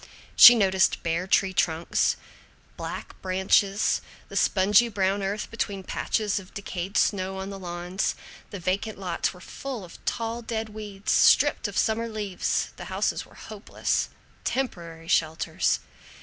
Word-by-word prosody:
She 240 - +11
noted 190 -3 +3
bare 170 +2 -1
tree 190 0 +2
trunks, 165 -2 +1 0.6
black - - -7
branches, 190 +2 +2 0.3
the - - -9
spongy 205 +4 +4
brown 195 -1 0
earth 200 +2 -3
between 200 -4 -3
patches 210 +2 -1
of 190 0 -15
decayed 195 -1 -4
snow 190 -1 +1
on 190 +1 -5
the 195 - -7
lawns. 175 +1 -3 0.3
The 200 - -7
vacant 190 +5 -2
lots 180 -3 -2
were 180 - -14
full 245 +2 -7
of 170 - -15
tall 230 +1 -2
dead 225 -1 -4
weeds. 205 -2 -5
Stripped 290 -5 +4
of 205 - -6
summer 225 +1 +1
leaves 210 -4 -2
the - - -8
houses - - -2
were - - -19
hopeless 215 -1 -3 0.3
temporary 170 -11 -3
shelters. 160 -1 +1
195 Hz, 140 wpm, -26 LUFS, 185-215 Hz, 0.6 s, She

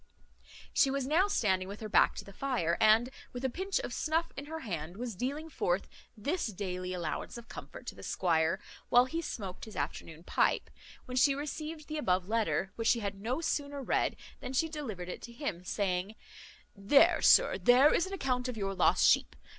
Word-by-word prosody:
She 275 - +4
was 275 -1 -1
now 330 +8 +3
standing 190 - +1
with 200 +2 -7
her 220 - -5
back - - +4
to - - -7
the 200 - -12
fire, 215 -10 0
and, 225 +3 +5 0.2
with 250 +1 -4
a 260 - 0
pinch 385 +7 -2
of - - -5
snuff 325 +1 0
in 280 - -6
her 320 +2 -6
hand, 175 - -5
was 240 0 -4
dealing 280 - -3
forth 190 - -1 0.3
this 290 - -1
daily 185 -3 -4
allowance 175 +4 -4
of 235 -1 -11
comfort - - -10
to - - -5
the - - -13
squire, 165 +1 +1 0.3
while 245 +1 +6
he 330 +6 -3
smoaked 195 - -6
his 220 - -11
afternoon 160 +2 -5
pipe, - - +1 0.3
when 250 0 -5
she 275 +2 +5
received 305 +2 -5
the 310 0 -3
above 185 -8 +1
letter; 195 -5 0
which 230 -1 -1
she 235 - +3
had 200 -1 -4
no 250 +8 -2
sooner 285 -3 -2
read - - +1 0.2
than 255 - -6
she 320 +5 +2
delivered 245 - -6
it 180 - -6
to 235 - -9
him, 235 - -4
saying, 190 +1 -1 0.6
"There, 275 - +5
sir, - - +5
there 255 +4 +6
is 345 - +2
an 385 - -7
account 255 -8 -1
of 250 -3 -5
your 195 -2 -2
lost 185 - +4
sheep. - - +3
235 Hz, 200 wpm, -31 LUFS, 190-285 Hz, 0.6 s, while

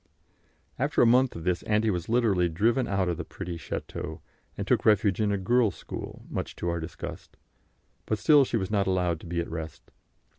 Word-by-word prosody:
After 140 +1 +3
a - - +6
month 125 +2 +4
of 85 - -6
this 90 0 0
Auntie 105 +1 +1
was 90 0 -3
literally 105 -7 +3
driven 115 +9 +1
out 95 -2 0
of 85 -2 -1
the 85 - -4
pretty 90 +1 -6
château, 85 - -6 0.4
and - - -3
took - - +2
refuge 105 -2 +3
in 105 -1 +2
a 100 - +1
girls' 110 +1 +2
school, - - -8
much - - -4
to 85 - -3
our 85 0 -1
disgust; 80 +1 -8 0.7
but 110 - 0
still 145 +4 +6
she 120 - -1
was 95 -2 -3
not 100 -2 +1
allowed 90 -3 +1
to - - -11
be 85 0 -2
at 85 - -2
rest. 80 -1 -7
95 Hz, 200 wpm, -27 LUFS, 85-115 Hz, 0.7 s, a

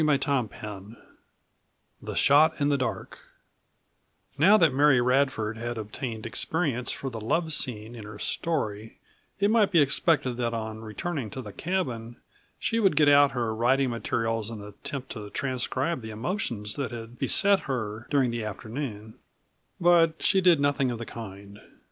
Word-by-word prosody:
CHAPTER 140 -5 +1
XIX 105 +1 -8 1.1
THE - - -6
SHOT 155 +3 +5
IN 145 0 +2
THE 140 - +2
DARK 130 - -4 1.2
Now 190 +9 +6
that 165 -8 +4
Mary 140 -1 +5
Radford 125 -3 +1
had 120 0 -4
obtained 110 +1 -5
experience 130 0 -1
for 135 - -5
the 115 -2 -6
love 160 +8 0
scene 120 -5 -3
in 115 -3 -9
her 105 0 -9
story 110 -6 -3 0.4
it 200 +1 +3
might 220 -3 +4
be 175 -4 +4
expected 140 -3 +2
that 120 -1 -1
on 110 -1 -5
returning 115 +4 -4
to 130 - -6
the 105 -3 -9
cabin 125 -11 -3 0.4
she 230 - -1
would 195 -7 +3
get 150 -1 +5
out 145 0 +6
her 120 -3 -1
writing 125 +3 +2
materials 115 -1 -2
and 110 -3 -7
attempt 125 +6 -7
to 105 -3 -7
transcribe 130 +5 -2
the 110 - -7
emotions 110 - -3
that 140 -2 -2
had 115 0 -9
beset 200 -1 +4
her 110 -3 -3
during 135 -4 +2
the 115 -1 -3
afternoon, 110 +1 -6 0.7
but 170 -2 +4
she 195 -2 +4
did 175 -4 +5
nothing 140 -2 +1
of 120 - -3
the 115 - -6
kind. 100 -2 -9
125 Hz, 160 wpm, -27 LUFS, 110-145 Hz, 1.2 s, Now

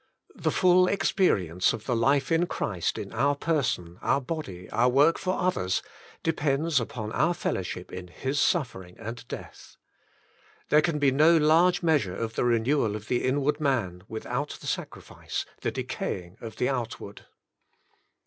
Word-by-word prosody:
'' - - -28
The - - -1
full 185 0 +4
experience 95 - +2
of 105 - -7
the 125 - 0
life 135 +5 +2
in 165 +2 +3
Christ 90 - -2
in - - -6
our 140 +1 +2
person, 130 - -1
our 140 - +2
body, 125 - -6
our 120 +2 +3
work 145 +6 +4
for 185 0 -1
others, 95 - 0 0.4
depends 150 -1 +1
upon 110 -2 -5
our 170 +8 +2
fellowship 90 - -4
in 90 -1 -6
His 135 +11 -3
suf 145 -6 +2
fering 90 -1 -11
and 115 +1 -7
death. - - -10 0.9
There 150 - +6
can 160 -1 0
be 145 -2 +3
no 155 +5 +5
large 165 +4 +4
measure 145 - +2
of 115 +1 -3
the - - 0
renewal 120 -1 +2
of 105 0 -8
the 125 - +1
inward 140 +3 +1
man, 115 - 0
without 125 +6 -4
the - - -12
sacrifice, - - -4 0.2
the - - 0
decaying 90 -1 -4
of 115 -1 -7
the 125 - 0
outward. 115 -5 -5
130 Hz, 160 wpm, -27 LUFS, 105-155 Hz, 0.9 s, There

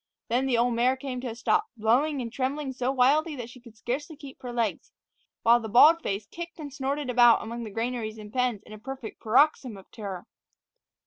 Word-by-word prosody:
Then 250 +3 +1
the 245 -3 +2
old 240 +1 +2
mare 250 +3 +2
came 260 -2 -5
to 255 - -5
a 225 - -5
stop, 235 - +1
blowing 255 +6 +2
and 230 0 -7
trembling 270 +1 -2
so 255 0 -1
wildly 290 +5 +3
that 240 -2 -7
she 255 - -14
could 235 -3 -16
scarcely 290 +8 -4
keep 280 -3 -12
her 245 - -6
legs, 230 -4 -2 0.5
while 235 +1 +6
the 220 -2 -6
bald 310 +9 +7
face 200 -6 -3
kicked 340 +7 -8
and 290 -4 -8
snorted 280 0 -2
about 240 -2 +5
among 235 +1 -6
the - - -6
granaries 225 0 -3
and 210 0 -11
pens 250 -5 0
in - - -12
a 215 - -10
perfect 260 -1 -8
paroxysm 250 -1 +2
of 190 - -16
terror. 195 -5 -7
245 Hz, 210 wpm, -27 LUFS, 225-270 Hz, 0.5 s, bald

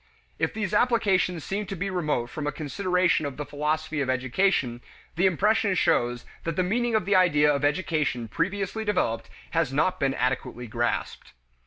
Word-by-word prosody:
If - - +1
these 215 -2 -2
applications 205 -7 +2
seem 200 +1 -3
to 195 - -4
be 195 +2 -3
remote 150 -9 -1
from 150 -1 -4
a - - 0
consideration 180 +3 +1
of 140 - -7
the 150 - -4
philosophy 150 +1 -2
of 130 - -1
education, 130 0 +1 0.3
the 180 +4 +3
impression 200 +2 +2
shows 120 -7 +1 0.2
that 165 -1 -2
the 185 - +2
meaning 235 +5 0
of 215 - +1
the 200 +1 +2
idea 150 -5 +4
of 140 0 -2
education 145 -6 0
previously 195 - -2
developed 160 - -1 0.2
has 165 -5 +1
not 155 +7 +1
been 135 -1 +1
adequately 125 -1 -2
grasped. 120 - -3
160 Hz, 170 wpm, -26 LUFS, 140-195 Hz, 0.3 s, idea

